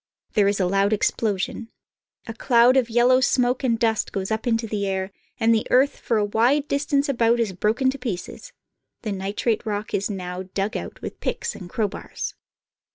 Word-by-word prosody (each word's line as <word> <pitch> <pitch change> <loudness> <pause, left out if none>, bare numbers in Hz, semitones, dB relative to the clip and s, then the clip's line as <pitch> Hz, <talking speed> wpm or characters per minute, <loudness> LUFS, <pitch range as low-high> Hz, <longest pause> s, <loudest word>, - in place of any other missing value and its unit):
There 205 -2 +4
is 200 0 +1
a 185 - +2
loud 195 +3 +2
explosion. 215 +1 -1 0.6
A 225 - -6
cloud 240 +1 +4
of 255 -3 +2
yellow 240 +2 +4
smoke 250 0 +2
and 235 -3 +2
dust 225 -2 0
goes 190 +1 -3
up 220 +3 -2
into 225 -1 +1
the 205 -2 -2
air, 190 0 -2 0.3
and 230 0 +4
the 220 - 0
earth 265 +3 +3
for 230 - 0
a 210 - +2
wide 245 +8 +2
distance 280 0 +1
about 235 -3 +2
is 220 -5 0
broken 225 +8 +1
to 275 - -8
pieces. 245 - -6 0.5
The 215 - -2
nitrate 200 +3 -1
rock 210 -1 -4
is 200 - 0
now 180 -2 -5
dug 200 +3 -1
out - - -6
with - - -6
picks 465 - -2
and 180 -3 -10
crowbars. 215 -2 -3
225 Hz, 185 wpm, -23 LUFS, 200-245 Hz, 0.6 s, There